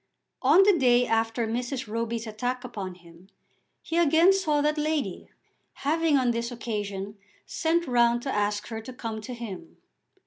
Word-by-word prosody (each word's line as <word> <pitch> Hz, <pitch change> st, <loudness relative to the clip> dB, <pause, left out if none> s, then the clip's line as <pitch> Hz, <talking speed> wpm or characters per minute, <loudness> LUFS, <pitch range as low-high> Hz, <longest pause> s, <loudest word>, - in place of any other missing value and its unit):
On 385 Hz, -, +6 dB
the 400 Hz, -1 st, +5 dB
day 250 Hz, -5 st, +4 dB
after 225 Hz, 0 st, 0 dB
Mrs. 245 Hz, +3 st, -3 dB
Roby's 230 Hz, +1 st, -3 dB
attack 245 Hz, +4 st, -3 dB
upon 200 Hz, -7 st, -6 dB
him 170 Hz, +1 st, -18 dB, 0.5 s
he 330 Hz, -, -1 dB
again 335 Hz, +3 st, +5 dB
saw 315 Hz, -7 st, +1 dB
that 300 Hz, +1 st, +1 dB
lady, 300 Hz, -, -2 dB, 0.6 s
having 320 Hz, 0 st, +3 dB
on 250 Hz, -2 st, +2 dB
this 235 Hz, +1 st, -3 dB
occasion 205 Hz, -3 st, -5 dB, 0.3 s
sent 335 Hz, +1 st, 0 dB
round 240 Hz, -2 st, +2 dB
to 270 Hz, -, -2 dB
ask 205 Hz, +1 st, -1 dB
her 225 Hz, -1 st, -5 dB
to 255 Hz, +3 st, -9 dB
come 225 Hz, -3 st, -5 dB
to 250 Hz, +3 st, -7 dB
him. 235 Hz, -, -8 dB
240 Hz, 160 wpm, -27 LUFS, 220-295 Hz, 0.6 s, On